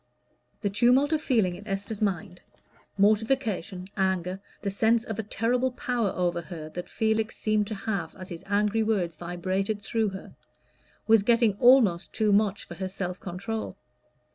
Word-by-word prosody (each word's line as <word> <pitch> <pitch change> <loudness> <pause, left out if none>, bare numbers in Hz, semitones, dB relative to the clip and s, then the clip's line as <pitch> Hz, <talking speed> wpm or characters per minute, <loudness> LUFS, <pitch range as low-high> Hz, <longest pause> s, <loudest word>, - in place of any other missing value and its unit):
The 205 - 0
tumult 250 +8 +4
of 310 - +1
feeling 220 -11 +2
in 205 - -12
Esther's 200 +2 -3
mind 185 -3 -2 0.6
mortification, 210 -3 +1
anger, 190 -1 0 0.2
the 200 - -1
sense 225 +3 +2
of 220 -3 -5
a - - +2
terrible 240 +5 0
power 240 -4 -1
over 175 -1 0
her 160 -3 -8
that 175 +2 -7
Felix 220 0 0
seemed 215 -1 +1
to 215 - -4
have 195 -5 -3
as 185 -1 -9
his 170 0 -8
angry 210 +2 +2
words 195 -7 0
vibrated 185 +5 -2
through 220 0 0
her 190 0 -9 0.7
was 225 -1 +6
getting 230 0 +3
almost 240 -9 +5
too 215 -2 +2
much 205 -1 +1
for - - -8
her 185 +2 -4
self 180 -1 -4
control. 200 +5 -5
205 Hz, 160 wpm, -27 LUFS, 185-225 Hz, 0.7 s, was